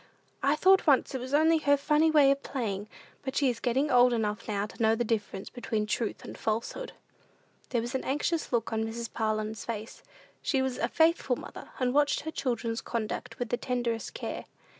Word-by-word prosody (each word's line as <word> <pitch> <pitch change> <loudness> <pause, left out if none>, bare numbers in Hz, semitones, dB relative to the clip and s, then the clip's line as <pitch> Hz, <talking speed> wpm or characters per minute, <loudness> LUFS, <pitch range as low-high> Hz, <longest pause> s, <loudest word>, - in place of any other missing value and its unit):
I 280 +2 +3
thought 380 +4 +5
once 280 -1 +4
it 260 - -3
was 255 +1 -6
only 320 +2 +4
her 285 -1 +4
funny 300 +3 +3
way 295 -3 +6
of 275 0 0
playing; 210 -8 -3 0.3
but 265 -1 -5
she 280 -3 +3
is 235 - -7
getting 265 +4 +1
old 250 0 +6
enough 215 -1 -1
now 205 -2 -1
to 215 - -10
know 220 0 +4
the 240 - 0
difference 210 -3 -3
between 220 -3 -2
truth 215 +1 -2
and - - -8
falsehood." 230 - -3 0.8
There 235 - +1
was 240 +3 -5
an 265 - -1
anxious 295 +4 -1
look 235 -2 0
on 220 0 0
Mrs. 230 +1 -5
Parlin's 215 -1 -1
face. 225 0 -6 0.4
She 270 - +1
was 265 -1 -1
a - - +1
faithful 320 -5 +3
mother, - - -10
and 250 -1 +1
watched 290 0 +3
her 315 - -5
children's 235 -5 -2
conduct 225 -3 -4
with 245 -2 -3
the 245 - 0
tenderest 240 -3 -2
care. - - -5
245 Hz, 200 wpm, -29 LUFS, 225-280 Hz, 0.8 s, way